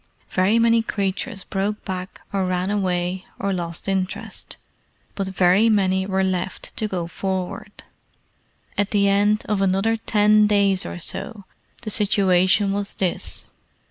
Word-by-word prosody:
Very 190 +4 +3
many 230 0 +4
creatures 200 0 -3
broke 205 +2 -3
back 185 -1 -6
or 190 -2 0
ran 185 +1 -1
away 185 -2 -1
or 200 0 -1
lost 170 -1 -5
interest, 190 -1 -4 0.6
but 195 -1 -3
very 190 +3 +3
many 190 -3 +2
were 190 -1 +1
left 185 0 -3
to 215 - 0
go 180 -4 -3
forward. 190 +3 -5 1.0
At 205 0 +1
the 200 -1 +2
end 205 +2 +2
of 210 -2 0
another 195 +4 +2
ten 210 -1 +3
days 200 -2 +2
or - - -6
so 200 +5 -4 0.4
the 215 - -2
situation 195 -1 +3
was 200 0 -3
this. 185 -3 -1
195 Hz, 140 wpm, -22 LUFS, 185-210 Hz, 1.0 s, many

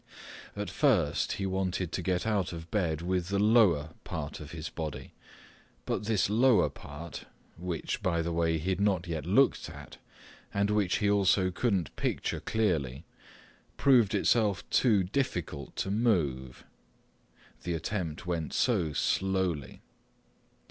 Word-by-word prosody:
At 100 -3 -4
first 100 - +2
he 95 - -3
wanted 95 -2 -1
to - - -2
get 90 +1 -1
out 100 -5 0
of 80 0 -8
bed 85 -6 0
with 90 -1 -1
the 100 +1 0
lower 100 -8 +4
part 75 -2 -5
of 75 - -9
his 80 -1 -6
body, 80 -3 -6 0.7
but - - -2
this 110 -2 +2
lower 115 +3 +4
part—which, 85 +3 -7
by 85 -2 0
the 85 - -2
way, 85 -1 +1
he 85 +5 -2
had 95 - -1
not 95 -4 +2
yet 85 -1 -4
looked 115 -1 +3
at 70 -2 -11 0.5
and 100 +1 +1
which 105 -4 +2
he 105 - +1
also 95 -2 +3
couldn't 95 - -1
picture - - -1
clearly—proved 105 - -1
itself 105 -1 +2
too 110 -7 +4
difficult 90 - -3
to 95 - -2
move. 75 - 0 1.0
The 85 -1 -2
attempt 85 -2 -4
went 85 -4 -3
so 90 - +1
slowly. 95 -5 -1
90 Hz, 135 wpm, -30 LUFS, 80-105 Hz, 1.0 s, lower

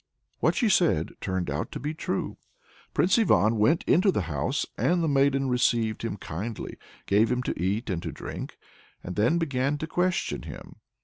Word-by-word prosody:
What - - +2
she 240 - +2
said 170 - +3
turned 95 -2 -2
out 75 +2 -3
to - - -4
be 150 +4 -3
true. 155 -10 -3 0.5
Prince 190 +6 +3
Ivan 115 - +3
went 150 +11 +3
into 190 +3 +4
the 105 - -1
house, 80 - -1
and 175 0 +1
the - - +1
maiden 135 -1 +2
received 120 -3 +1
him 115 -3 -3
kindly, 100 +6 -6 0.3
gave 105 +4 +3
him 125 0 0
to 85 - -3
eat 100 +6 0
and 90 -5 -2
to - - -4
drink, - - -7 0.5
and 90 - -6
then 120 +11 +3
began 140 -3 0
to 155 - -3
question 180 +3 0
him. - - -10
125 Hz, 180 wpm, -27 LUFS, 100-160 Hz, 0.5 s, into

